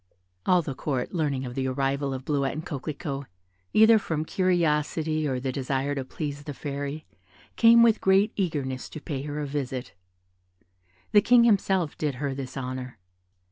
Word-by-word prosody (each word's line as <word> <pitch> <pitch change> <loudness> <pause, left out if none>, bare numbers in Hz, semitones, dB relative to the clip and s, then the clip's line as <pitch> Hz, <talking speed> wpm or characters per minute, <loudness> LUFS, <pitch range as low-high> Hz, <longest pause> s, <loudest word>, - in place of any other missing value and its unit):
All 180 -2 +4
the 140 - -4
Court 130 -2 -3
learning 140 -7 -1
the 130 +1 -1
arrival 135 +1 -1
of 130 0 -5
Bleuette 140 -2 0
and 155 +2 -6
Coquelicot, 140 -1 -5 0.4
either 220 +1 +6
from 160 -5 -2
curiosity 160 -3 +1
or 130 -2 -1
the 130 +1 -2
desire 135 +1 -1
to 135 -2 -3
please 145 +1 -6
the 145 - -6
Fairy, 145 +2 -5 0.5
came 230 0 +7
with 230 -2 +4
great 195 +3 +3
eagerness 145 -9 -2
to - - -8
pay 145 -3 -4
her 145 +1 -4
a 150 - -2
visit. 135 -3 -4 1.2
The 205 - +6
King 240 +3 +6
himself 190 -7 +2
did 150 -3 -1
her 140 +1 -2
this 135 -1 -6
honour. 130 -2 -5
145 Hz, 160 wpm, -26 LUFS, 135-165 Hz, 1.2 s, came